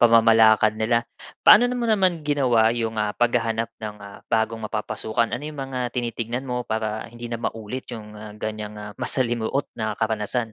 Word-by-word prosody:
pamamalakad 110 -2 +6
nila. 115 +2 +1 0.4
Paano 230 - +8
na 245 - 0
mo 240 -1 -1
naman 185 -6 +2
ginawa 130 -7 +3
'yong, 115 -2 -1
ah, 105 -1 -1
paghahanap 115 -2 +1
ng, 105 -1 -5
ah, 100 0 -11
bagong 115 0 0
mapapasukan? 110 +1 -1
Ano 125 - -2
'yong 155 0 -6
mga 135 -1 -5 0.2
tinitignan 120 +1 -2
mo 125 -2 -4
para 110 0 -2
hindi 120 +1 -8
na 115 - -3
maulit 115 +2 -5
'yong, 110 -2 -7
ah, 105 0 -9
ganyang, 105 0 -5
ah, 105 0 -7
masalimuot 120 +1 0
na 110 -2 -3
karanasan? 110 +1 -1
115 Hz, 170 wpm, -24 LUFS, 110-125 Hz, 0.4 s, Paano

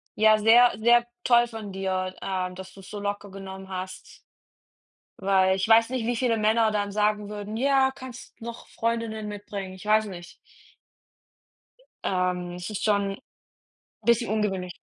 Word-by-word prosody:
ja 215 0 +5
sehr, 235 +3 +6
sehr 235 +1 +5 0.2
toll 240 -1 +5
von 220 -3 -7
dir, 185 -1 -2
ähm, 185 -1 -3
dass 190 0 -10
du's 195 -1 -13
so 210 - -6
locker 205 0 -4
genommen 190 0 -9
hast. 185 0 -7 1.0
Weil 190 -1 +3
ich 190 - -1
weiß 225 +1 +6
nicht, 255 -3 -2
wie 240 +1 0
viele 230 -1 +1
Männer 220 +1 +3
dann 205 -1 -1
sagen 210 0 +1
würden: 210 +1 -5
„Ja, 265 +1 +3
kannst 255 -2 -11
noch 235 +1 -8
Freundinnen 230 -2 -2
mitbringen.“ 205 -2 -6
Ich 190 +2 -12
weiß 215 +1 +4
nicht. 175 -3 -9 1.7
Ähm, 180 -1 -1
es 180 +2 -6
ist 210 - -4
schon 200 -2 +1 0.9
bisschen 235 +1 +2
ungewöhnlich. 195 -4 -1
210 Hz, 150 wpm, -26 LUFS, 190-225 Hz, 1.7 s, sehr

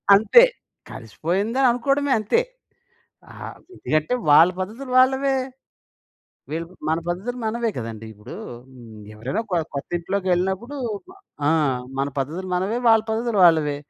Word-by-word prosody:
అంతే 350 - +6 0.5
కలిసిపోయిందని 195 - -1
అనుకోవడమే 275 +3 0
అంతే. 215 - +1 0.9
ఆహ్, - - -9 0.2
ఎందుకంటే 155 +10 0 0.2
వాళ్ళ 160 +4 +8
పద్ధతులు 235 +7 -6
వాళ్ళవే. 265 +1 +3 1.1
వీళ్ళు 165 +2 -3 0.2
మన 160 +1 +1
పద్ధతులు 210 +9 -3
మనవే 230 +1 -1
కదండీ! 115 -2 -6
ఇప్పుడు 105 +1 -11 0.3
హ్మ్. 115 -4 -13
ఎవరైనా 125 - -3
కొ 180 - +1 0.2
కొత్తింట్లోకెళ్ళినప్పుడు 185 - -2 0.7
ఆ! - - +4 0.5
మన 140 - +1
పద్ధతులు 165 +8 -4
మనవే 195 +6 -1
వాళ్ళ 225 -1 +5
పద్ధతులు 225 -1 -1
వాళ్ళవే. 155 -4 +4
190 Hz, 110 wpm, -22 LUFS, 155-235 Hz, 1.1 s, వాళ్ళ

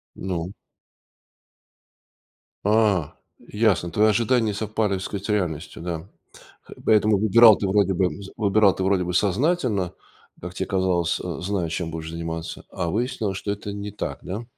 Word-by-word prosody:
Ну? 90 -1 -4 2.1
А, 105 -7 +2 0.3
ясно. 105 -6 0
Твои 105 +5 +3
ожидания 115 +2 +2
не 105 - -1
совпали, 105 0 -1
так 95 - -2
сказать, 100 0 -5
с - - -6
реальностью, 85 -6 -2
да. 85 +2 -5 0.8
Поэтому 105 -2 +4
выбирал 110 +1 +7
ты 100 - -2
вроде 95 -1 +2
бы 90 -1 +1
с 95 - -9
выбирал 100 -2 +3
ты 95 - -4
вроде 95 -2 +2
бы 90 0 -3
сознательно, 105 - +1 0.5
как 90 +1 -7
те 95 - -3
казалось, 90 -3 +1
а, 90 -2 -5
зная, 90 -2 -2
чем 80 0 -3
будешь 80 0 -6
заниматься, 85 0 -5
а 85 - -3
выяснилось, 110 -3 -2
что 100 - -4
это 100 0 -4
не 100 0 -5
так, - - -5
да? 105 +6 -5
100 Hz, 155 wpm, -24 LUFS, 90-105 Hz, 2.1 s, выбирал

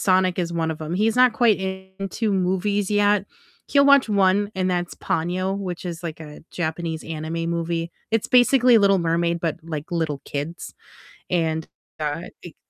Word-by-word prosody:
Sonic 185 -1 +2
is 170 -1 -1
one 165 -1 -1
of 160 - -6
'em, 155 +3 -4
he's 220 +4 +1
not 250 -2 +6
quite 230 -5 +3
into 190 +3 -4
movies 190 +2 0
yet, 205 -1 +3 0.4
he'll 280 -1 +4
watch 280 -4 +6
one, 200 0 +2
and 185 -1 0
that's 175 -1 -2
Ponyo, 185 +4 -1
which 185 -2 -5
is, 170 -1 -5
like, 160 -2 -5
a 150 -1 -10
Japanese 160 -1 -3
anime 165 +1 -4
movie, 170 0 -2 0.2
it's 225 -1 +1
basically 250 -1 +5
Little 195 -1 +4
Mermaid, 170 0 0
but, 165 -1 -2
like, 155 -1 -6
little 155 -4 -1
kids, 150 +4 -5 0.6
and, 160 -2 0 0.3
uh, 150 +2 -2 0.2
it 175 - -11
180 Hz, 165 wpm, -23 LUFS, 165-200 Hz, 0.6 s, not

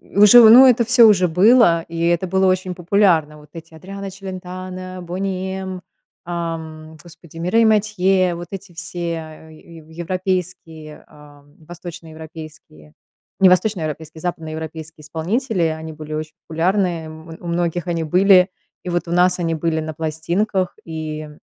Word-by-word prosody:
уже, 210 +4 +6
ну 250 +4 +9
это 245 -2 +4
всё 240 +1 +5
уже 185 -4 +4
было, 180 0 +4
и 165 0 -6
это 175 +2 +1
было 190 +1 +1
очень 185 -1 0
популярно. 175 -4 +1
Вот 150 -1 -18
эти 165 -1 -11
Адриано 195 +4 -8
Челентано, 185 -1 -8
"Бони 190 +1 -4
М", 185 -1 -7 0.4
ам, 160 -2 -6
господи, 165 -1 -15
Мирей 185 +7 +2
Матьё, 195 -4 +2
вот 170 0 -8
эти 195 -1 -9
все 175 +1 -7 0.5
е 160 +1 -15
ев 155 -1 -17
европейские, 170 -2 -5
а, 145 -1 -18 0.2
восточноевропейские- 160 - -11 0.5
не 190 - +7
восточноевропейские, 160 -5 -1
западноевропейские 160 -2 -6
исполнители,- 185 - -2 0.2
они 160 0 -7
были 155 0 -8
очень 155 0 -5
популярны, 180 +4 +1 0.2
м, 160 +1 -11
у - - -10
многих 170 0 -2
они 170 -2 -2
были. 185 +3 +4 0.3
И 180 - -5
вот 175 0 -2
у 170 - -4
нас 180 +1 +3
они 165 -2 -1
были 160 0 -1
на 155 0 -6
пластинках, 170 +5 -2
и 155 -1 -6
175 Hz, 145 wpm, -19 LUFS, 160-185 Hz, 0.5 s, ну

